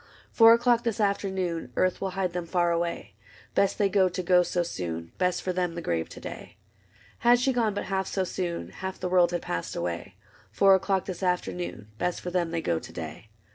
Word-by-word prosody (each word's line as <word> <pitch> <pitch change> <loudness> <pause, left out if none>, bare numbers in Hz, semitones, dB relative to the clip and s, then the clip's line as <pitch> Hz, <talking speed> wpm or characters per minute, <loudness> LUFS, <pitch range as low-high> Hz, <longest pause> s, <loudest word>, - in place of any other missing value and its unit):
Four 225 -1 +8
o'clock 240 0 +2
this 230 -2 -1
afternoon, 190 - -1
Earth 185 -1 +1
will 195 - -1
hide 185 -2 0
them 175 -1 -3
far 175 -1 +2
away: 170 - -2 0.4
Best 200 - +2
they 205 - +3
go 190 -1 +3
to 180 +1 -4
go 180 0 +5
so 175 0 0
soon. 85 - -5
Best 180 -1 +1
for 185 - -1
them 180 -2 -1
the 170 - -4
grave 80 -1 -1
to - - -10
day. - - -9 0.6
Had 240 +1 +5
she 265 +2 +2
gone 225 -4 +1
but - - -2
half 190 -1 -1
so 190 - -1
soon. 175 -2 -3
Half 190 0 -6
the 180 - -2
world 180 -1 +4
had 175 -1 -3
passed 85 - -3
away. 85 +2 -4 0.4
Four 195 -1 +5
o'clock 190 0 +1
this 185 -1 -6
afternoon. 180 - -2
Best 180 - -1
for 180 - -5
them 175 -2 0
they 165 0 -2
go 85 -1 0
to - - -11
day. 110 - -8
180 Hz, 215 wpm, -27 LUFS, 170-195 Hz, 0.6 s, Four